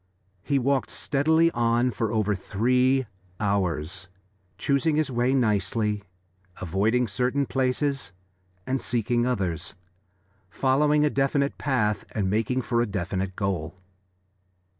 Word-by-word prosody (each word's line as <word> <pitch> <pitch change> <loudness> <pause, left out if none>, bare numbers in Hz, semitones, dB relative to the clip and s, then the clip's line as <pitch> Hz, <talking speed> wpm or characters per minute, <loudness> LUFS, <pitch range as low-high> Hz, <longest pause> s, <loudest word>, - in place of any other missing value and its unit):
He 140 +8 0
walked 135 0 +1
steadily 160 +4 +2
on 120 0 +1
for 110 0 -2
over 105 -2 +1
three 125 +7 +1 0.3
hours, 90 -3 -1 0.5
choosing 140 +3 +1
his 155 -3 0
way 120 +1 +1
nicely, 105 -2 +1 0.6
avoiding 105 +8 +1
certain 125 +7 0
places 135 -1 -1 0.5
and 130 0 -1
seeking 120 +1 0
others, 95 -8 -2 0.7
following 150 +6 +2
a 150 - +1
definite 140 +1 +1
path 110 -7 0
and 95 -3 0
making 115 +4 0
for 120 +2 +1
a 120 - 0
definite 95 -1 -3
goal. 95 -3 -3
120 Hz, 115 wpm, -26 LUFS, 100-135 Hz, 0.7 s, steadily